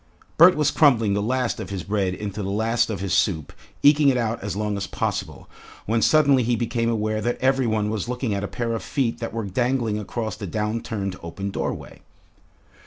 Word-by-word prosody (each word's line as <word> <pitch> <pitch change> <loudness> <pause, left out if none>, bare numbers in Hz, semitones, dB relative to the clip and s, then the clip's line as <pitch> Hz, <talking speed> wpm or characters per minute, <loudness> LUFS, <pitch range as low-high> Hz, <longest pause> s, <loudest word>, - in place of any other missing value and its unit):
Bert 180 +3 +7
was 150 -1 +2
crumbling 115 -9 +4
the 100 - 0
last 125 +2 -1
of - - -6
his 95 -3 -4
bread 95 -2 -1
into 105 +1 -5
the 95 - -3
last 115 +3 +1
of 100 -4 -4
his 95 -3 -2
soup, 80 -7 +1 0.3
eking 145 0 +6
it 130 - +2
out 115 -1 -1
as 100 -1 -3
long 105 0 -1
as 100 - -3
possible, - - -3 0.4
when 115 +2 +1
suddenly 145 -3 +4
he 120 0 +1
became 115 0 -1
aware 110 -1 -1
that 120 +1 -1
every 130 -1 +2
one 105 -1 0
was 110 +1 -3
looking 125 -3 -2
at 100 0 -2
a - - -2
pair 115 +1 -3
of 115 - -3
feet 130 -5 -1
that 115 - -4
were 115 -2 -3
dangling 120 +1 0
across 110 0 -4
the 105 -2 -6
downturned 105 -1 -3
open 95 +4 -5
doorway. - - -5
110 Hz, 205 wpm, -23 LUFS, 100-120 Hz, 0.4 s, Bert